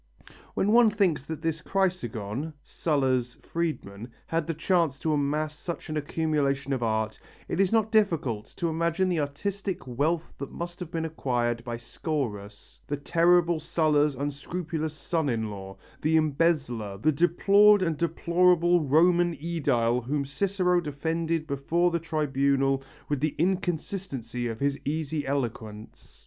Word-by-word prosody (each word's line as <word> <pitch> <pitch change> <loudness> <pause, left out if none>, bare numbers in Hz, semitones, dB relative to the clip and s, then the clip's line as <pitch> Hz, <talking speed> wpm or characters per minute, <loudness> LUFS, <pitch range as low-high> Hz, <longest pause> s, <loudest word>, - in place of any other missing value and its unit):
When 205 - +2
one 235 0 +7
thinks 190 -10 +1
that 160 +1 -6
this 165 0 -1
Chrysogon, 150 - -2
Sulla's 130 -6 0
freedman, 125 -10 -4 0.2
had 165 -1 -1
the 165 - -1
chance 165 -4 +1
to 155 +2 -1
amass 150 +1 0
such 170 +2 -6
an 155 - -2
accumulation 145 -3 0
of 130 - -2
art, 110 -1 -1 0.3
it - - -3
is 195 -2 +3
not 220 -1 +2
difficult 165 - +1
to 170 - 0
imagine 170 +3 0
the 175 -3 +1
artistic 190 +6 -3
wealth 150 +7 -1
that 140 - -6
must 175 +1 -6
have 180 -3 -6
been 165 -1 -2
acquired 120 -6 -1
by 120 -1 -4
Scaurus, 115 -6 -5
the 145 - -2
terrible 170 +2 +3
Sulla's 150 -2 +2
unscrupulous 155 +3 -4
son 160 -2 -1
in 110 -3 -1
law, 95 -1 -8 0.2
the 155 +1 +2
embezzler, 140 -9 0
the 155 +10 +2
deplored 195 +6 +5
and 165 -3 0
deplorable 175 +1 +3
Roman 170 +4 +4
Ædile 130 -7 0
whom 140 +3 -1
Cicero 180 +4 +1
defended 160 +2 -2
before 155 +5 +1
the 170 - 0
tribunal 140 -4 +1 0.3
with 145 -2 -1
the 150 +1 -1
inconsistency 170 - -2
of 115 -1 -5
his 140 0 0
easy 150 0 -2
eloquence. 115 -6 -5
155 Hz, 140 wpm, -27 LUFS, 135-170 Hz, 0.3 s, one